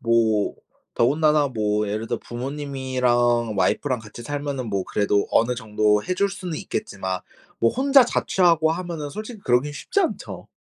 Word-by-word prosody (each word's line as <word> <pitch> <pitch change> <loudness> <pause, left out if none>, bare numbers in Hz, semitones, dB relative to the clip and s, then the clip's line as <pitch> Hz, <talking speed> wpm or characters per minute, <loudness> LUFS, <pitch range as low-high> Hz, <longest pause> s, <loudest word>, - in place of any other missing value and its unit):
뭐 115 -4 +2 0.4
더군다나 150 +3 +3
뭐 105 -3 0
예를 110 +2 -3
들어 - - -2
부모님이랑 125 -3 -1
와이프랑 130 +5 +1
같이 110 +2 -11
살면은 140 -2 -4
뭐 100 -2 -1
그래도 100 -1 +1
어느 125 +2 +3
정도 105 -2 +1
해 185 - -1
줄 200 +2 +1
수는 185 -5 -5
있겠지만 95 -1 -4 0.4
뭐 115 - +3
혼자 270 0 +5
자취하고 170 -8 +2
하면은 165 -4 -5
솔직히 215 +1 -7
그러긴 130 +4 +2
쉽지 400 - -1
않죠. 355 - -3
130 Hz, 340 characters per minute, -23 LUFS, 110-160 Hz, 0.4 s, 혼자